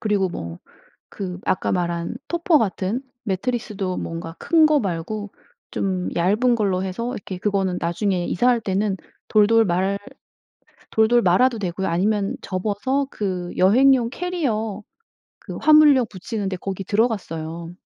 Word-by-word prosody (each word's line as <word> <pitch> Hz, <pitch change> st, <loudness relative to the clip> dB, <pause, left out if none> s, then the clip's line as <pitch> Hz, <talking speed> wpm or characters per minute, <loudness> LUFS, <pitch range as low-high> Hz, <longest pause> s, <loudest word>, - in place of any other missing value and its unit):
그리고 205 Hz, -3 st, +1 dB
뭐 85 Hz, -, -6 dB, 0.5 s
그 185 Hz, -2 st, -6 dB
아까 185 Hz, -, 0 dB
말한 170 Hz, -2 st, -2 dB
토퍼 340 Hz, -2 st, +3 dB
같은 205 Hz, 0 st, -1 dB, 0.2 s
매트리스도 200 Hz, -2 st, -2 dB
뭔가 165 Hz, 0 st, -5 dB
큰 320 Hz, -2 st, +4 dB
거 305 Hz, -1 st, +3 dB
말고 200 Hz, +3 st, -4 dB, 0.4 s
좀 185 Hz, -2 st, -2 dB
얇은 215 Hz, +8 st, +3 dB
걸로 195 Hz, -4 st, 0 dB
해서 230 Hz, +7 st, -3 dB
이렇게 190 Hz, -4 st, -6 dB
그거는 195 Hz, -2 st, 0 dB
나중에 175 Hz, +1 st, 0 dB
이사할 240 Hz, +4 st, +2 dB
때는 200 Hz, -1 st, -1 dB, 0.3 s
돌돌 225 Hz, +1 st, +5 dB
말 190 Hz, +2 st, 0 dB, 0.9 s
돌돌 225 Hz, +2 st, +4 dB
말아도 225 Hz, +5 st, +3 dB
되고요. 190 Hz, 0 st, -2 dB
아니면 200 Hz, +4 st, 0 dB
접어서 210 Hz, +9 st, -1 dB
그 185 Hz, -4 st, -3 dB
여행용 240 Hz, +5 st, +5 dB
캐리어 240 Hz, -, -2 dB, 0.6 s
그 -, -, -8 dB
화물용 300 Hz, -5 st, +6 dB
부치는 200 Hz, +1 st, -4 dB
데 185 Hz, -, -3 dB
거기 195 Hz, +1 st, -5 dB
들어갔어요. 170 Hz, -6 st, -2 dB
200 Hz, 280 characters per minute, -22 LUFS, 185-235 Hz, 0.9 s, 화물용